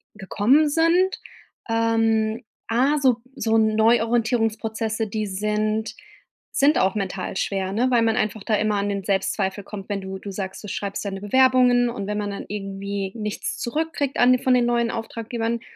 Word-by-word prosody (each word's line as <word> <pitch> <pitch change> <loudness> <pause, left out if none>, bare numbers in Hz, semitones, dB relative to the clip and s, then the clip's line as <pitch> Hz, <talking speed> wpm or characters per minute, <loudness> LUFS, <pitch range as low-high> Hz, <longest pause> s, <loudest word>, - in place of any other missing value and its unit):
gekommen 220 +9 +2
sind. 335 +5 +2 0.5
Ähm, 225 0 +1 0.3
A: 265 +6 +2
so 260 -4 +3 0.2
so 225 0 +1
Neuorientierungsprozesse, 225 0 +1
die 215 +1 -2
sind 215 +2 -1 0.6
sind 290 +2 +4
auch 190 +1 +2
mental 190 -2 -3
schwer, 190 -1 -1
ne, 240 +5 +2
weil 240 -2 +4
man 225 0 +1
einfach 215 -3 -1
da 215 - +1
immer 210 0 +1
an 200 0 -1
den 200 -1 -3
Selbstzweifel 195 0 -1
kommt, 195 0 -9
wenn 200 -1 -2
du 190 0 -6
du 200 +1 -7
sagst, 190 0 -6
du - - -7
schreibst 200 +1 -4
deine 195 -1 -4
Bewerbungen 250 +2 +4
und 235 -5 -5
wenn 210 0 -2
man 205 -1 -2
dann 200 - -6
irgendwie 195 -1 -4
nichts 210 -2 -4
zurückkriegt 290 +1 -2
an 245 +1 +6
de 255 - +1
von 260 - +3
den 245 -1 +3
neuen 235 -1 +1
Auftraggebern, 230 0 -3
220 Hz, 170 wpm, -23 LUFS, 200-240 Hz, 0.6 s, an